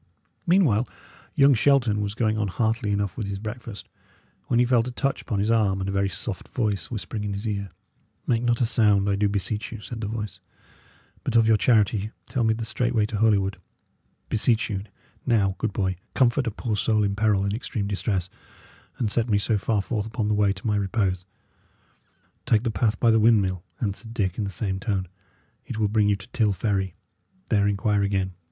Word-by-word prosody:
Meanwhile, 145 - +3 0.5
young 140 0 +6
Shelton 120 -4 +3
was 105 0 -3
going 110 -2 +1
on 105 -1 0
heartily 110 +2 0
enough 100 -3 -1
with 110 -4 -3
his 100 0 -3
breakfast, 110 +1 -7 0.6
when 120 - +2
he 120 - +5
felt 120 -1 +2
a - - -4
touch 135 +2 -1
upon 110 - -3
his 105 +3 +1
arm, 105 -4 +2
and 95 - -3
a - - -1
very 100 0 +1
soft 95 +2 -5
voice 105 -7 -1
whispering 110 -2 -4
in 105 -1 -2
his 100 +3 -4
ear. 100 -2 -2 0.6
"Make 115 -1 +1
not 120 -1 +1
a - - +4
sign, 105 -4 +3
I 100 - +2
do 100 +1 +1
beseech 105 +1 -2
you," 115 - -6
said 115 +2 -7
the 105 - -2
voice, 110 -1 -5 0.8
"but - - -2
of 115 -1 +5
your 110 - +6
charity 105 -2 +2 0.2
tell 130 -4 -1
me 110 0 +3
the 115 0 -4
straight 120 +1 -1
way 110 -2 +3
to 105 0 -4
Holywood. 100 -3 +2 0.7
Beseech 115 +1 +1
you, 100 0 -3 0.4
now, 100 -5 +3
good 115 - -1
boy, 95 -2 -1 0.2
comfort 130 0 +3
a - - 0
poor 110 +1 -2
soul 110 +1 +2
in 100 0 0
peril 105 -2 +2
and 100 0 -1
extreme 110 -2 -3
distress, 100 -2 -1 0.7
and 110 -4 -1
set 115 +1 +1
me 105 - +3
so 105 +2 +1
far 105 0 0
forth 110 -2 -2
upon 110 -1 -2
the - - +2
way 105 -1 +3
to 95 +2 -8
my 105 -2 +2
repose." 95 -3 0 1.2
"Take 110 0 +3
the 120 - 0
path 105 +1 0
by 115 - +4
the 110 - +4
windmill," 100 -5 +3 0.2
answered 110 +2 -4
Dick, 95 -3 -1
in 105 - 0
the - - -3
same 95 0 -3
tone; 95 -3 -1 0.6
"it 120 - -6
will 110 -1 +2
bring 105 -1 +3
you 100 - +3
to 100 +1 -11
Till 105 -4 +1
Ferry; 95 -2 -1 0.6
there 100 -2 +3
inquire 100 +1 +1
again." 100 -1 0
105 Hz, 205 wpm, -25 LUFS, 100-115 Hz, 1.2 s, young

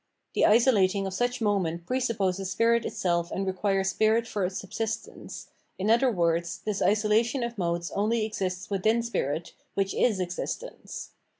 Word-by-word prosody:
The - - +4
isolating 205 -4 +4
of 190 - -3
such 245 +4 -1
moments 185 -6 0
pre 255 +7 0
supposes 195 -6 -1
spirit 230 +4 +2
itself 170 -1 0
and 195 - -2
requires 195 0 0
spirit 220 +3 +2
for 210 -3 -2
its 185 +1 -1
subsist 225 +3 -3
ence, - - -10 0.3
in 200 +4 +1
other 240 +3 +4
words, 170 -3 0
this 210 -2 -1
isolation 220 +4 +2
of 235 0 -3
modes 170 -3 -2
only 215 +2 +1
exists 190 -3 -3
within 220 +4 +2
spirit, 165 -8 -2 0.2
which 195 -1 0
is 215 -6 +2
existence. 185 - -5
200 Hz, 160 wpm, -27 LUFS, 185-230 Hz, 0.3 s, The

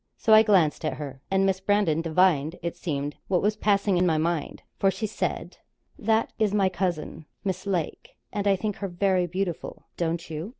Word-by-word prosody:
So 220 - +3
I 215 - +9
glanced 190 -10 +3
at 155 - -1
her, 135 -3 -7
and 195 0 +2
Miss 190 -1 +1
Brandon 195 -5 +2
divined, 165 -2 +2
it 170 0 -3
seemed, 145 -4 -3
what 185 -1 +1
was 210 +1 +2
passing 200 -2 +2
in 180 - +3
my 160 -2 +2
mind, 165 -1 -2 0.2
for 195 - +4
she 195 +3 -3
said: 215 - -3 0.4
'That 220 +1 +1
is 210 -2 +2
my 195 -2 +3
cousin, 175 -4 -3 0.2
Miss 190 0 -3
Lake, 175 -6 -3 0.2
and 205 -1 -1
I 200 - +5
think 210 +1 -3
her 200 - -3
very 185 0 +1
beautiful 180 -1 -4
don't 170 0 -2
you?' 160 +4 -5
185 Hz, 195 wpm, -26 LUFS, 165-200 Hz, 0.4 s, I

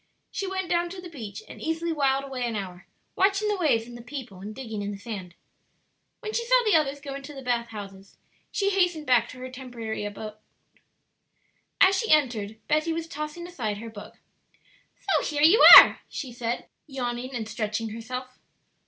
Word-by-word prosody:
She 395 - -3
went 380 -1 -3
down 345 0 0
to 370 +1 -8
the 360 -1 -10
beach 240 - -8
and - - -11
easily 325 +1 -2
whiled 275 -2 +1
away 265 -2 -5
an 230 - -3
hour 185 -3 -7 0.3
watching 395 +2 +2
the 415 - +1
waves 260 -11 +2
and 240 0 -11
the 240 - -9
people, 240 -6 -8
and 210 +2 -8
digging 225 -5 -6
in 200 - -3
the 205 - -5
sand. 195 -5 -8 0.9
When 430 -2 -5
she 470 - 0
saw - - +4
the 425 - +3
others 290 -3 +2
going 275 -1 -7
to 285 +2 -10
the 270 - -9
bath 240 -1 -1
houses 195 -3 -10 0.3
she 400 -1 0
hastened 355 -5 +1
back 245 -3 +3
to - - -11
her 255 0 -8
temporary 240 -5 -6
home. 210 +1 -6 1.5
As 385 +1 +6
she 450 - -2
entered 235 -8 +2
Betty 310 +2 +1
was 325 0 -3
tossing 305 +3 -6
aside 240 -13 -4
her 225 +2 -8
book. 205 -2 -11 0.9
"So - - +2
here 295 -1 -1
you 355 +9 +7
are!" - - +8
she 260 -5 -6
said, 235 0 -3 0.2
yawning 255 -1 -4
and 225 -3 -4
stretching 220 0 -3
herself. 250 +3 -7
255 Hz, 190 wpm, -26 LUFS, 225-325 Hz, 1.5 s, are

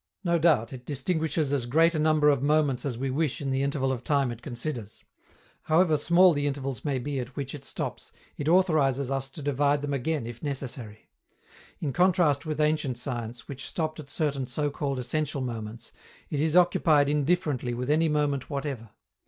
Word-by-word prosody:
No 170 -2 +2
doubt, 145 -8 +3
it 125 -1 -8
distinguishes 150 +1 -1
as 130 -4 -1
great 165 +6 +4
a 155 - -1
number 155 -1 +4
of 140 -3 0
moments 145 -3 +2
as 125 -4 -3
we 135 +1 -2
wish 145 0 -1
in 135 -2 -2
the 135 0 0
interval 140 -1 0
of 125 -2 -4
time 140 -2 +1
it 120 0 -8
considers. 120 -3 -6 0.6
However 160 0 +4
small 175 +4 +5
the 145 -1 0
intervals 135 -2 -3
may 140 -3 0
be 135 +2 -3
at 125 +1 -6
which 135 -2 -4
it 145 -2 -8
stops, - - -5 0.2
it 145 - -4
authorizes 145 -7 +3
us 135 0 -2
to 140 +2 -10
divide 145 +1 +1
them 145 0 -2
again 140 0 -1
if 120 0 -8
necessary. 130 -6 -6 0.7
In 140 -4 -2
contrast 175 -5 +3
with 155 -1 -3
ancient 150 -4 +1
science, 120 -2 -4
which 135 -1 -6
stopped 155 -1 -3
at 140 -3 -9
certain 140 -3 -1
so 145 +4 -1
called 140 -1 -2
essential 145 +3 -2
moments, 115 -2 -6 0.4
it 145 - -1
is 155 +2 +1
occupied 160 -5 +4
indifferently 145 -4 0
with 125 +4 -2
any 160 +1 +3
moment 145 -3 0
whatever. 135 -6 -4
140 Hz, 185 wpm, -27 LUFS, 130-155 Hz, 0.7 s, small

